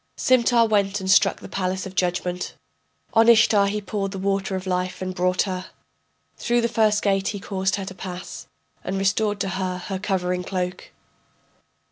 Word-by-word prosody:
Simtar 240 Hz, -2 st, +4 dB
went 205 Hz, -1 st, +1 dB
and 190 Hz, 0 st, 0 dB
struck -, -, +4 dB
the -, -, -8 dB
palace 185 Hz, 0 st, -2 dB
of 190 Hz, -, -8 dB
judgment, 180 Hz, 0 st, -2 dB, 0.6 s
On 225 Hz, 0 st, +5 dB
Ishtar 220 Hz, -3 st, +5 dB
he 210 Hz, +1 st, -1 dB
poured 195 Hz, 0 st, -3 dB
the -, -, -5 dB
water 195 Hz, 0 st, -1 dB
of 185 Hz, 0 st, -4 dB
life 180 Hz, 0 st, -2 dB
and 185 Hz, 0 st, -4 dB
brought 180 Hz, 0 st, +1 dB
her. 185 Hz, -2 st, -4 dB, 0.7 s
Through 240 Hz, 0 st, +1 dB
the 235 Hz, -, +2 dB
first 215 Hz, -2 st, +2 dB
gate 195 Hz, -1 st, +1 dB
he 205 Hz, -, -3 dB
caused 190 Hz, -1 st, -1 dB
her 195 Hz, -, -4 dB
to 190 Hz, -, -7 dB
pass, 185 Hz, 0 st, -8 dB, 0.4 s
And 190 Hz, +1 st, -3 dB
restored 205 Hz, +2 st, +1 dB
to 195 Hz, -, -1 dB
her 185 Hz, 0 st, -2 dB
her 190 Hz, +1 st, -5 dB
covering 180 Hz, -3 st, -1 dB
cloak. 180 Hz, -1 st, -4 dB
195 Hz, 175 wpm, -23 LUFS, 185-205 Hz, 0.7 s, On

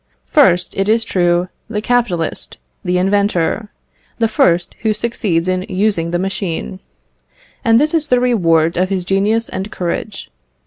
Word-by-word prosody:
First, 180 Hz, -, +3 dB
it 195 Hz, +1 st, 0 dB
is 225 Hz, +1 st, +2 dB
true, 175 Hz, 0 st, +1 dB, 0.2 s
the 210 Hz, -, -2 dB
capitalist, 210 Hz, -8 st, -1 dB, 0.3 s
the 180 Hz, 0 st, 0 dB
inventor; 200 Hz, +1 st, 0 dB, 0.5 s
the 230 Hz, -, +2 dB
first 175 Hz, -5 st, +1 dB
who 220 Hz, -2 st, 0 dB
succeeds 205 Hz, -6 st, -1 dB
in 185 Hz, 0 st, 0 dB
using 185 Hz, -3 st, 0 dB
the 175 Hz, -, 0 dB
machine; 185 Hz, 0 st, -3 dB, 0.8 s
and 230 Hz, -2 st, +4 dB
this 300 Hz, +3 st, +1 dB
is 315 Hz, -2 st, +1 dB
the 250 Hz, -3 st, +3 dB
reward 170 Hz, -10 st, +2 dB
of 185 Hz, +1 st, +1 dB
his 190 Hz, -3 st, -2 dB
genius 205 Hz, +4 st, +1 dB
and 195 Hz, +3 st, -5 dB
courage. 185 Hz, -, -4 dB
195 Hz, 145 wpm, -17 LUFS, 175-225 Hz, 0.8 s, and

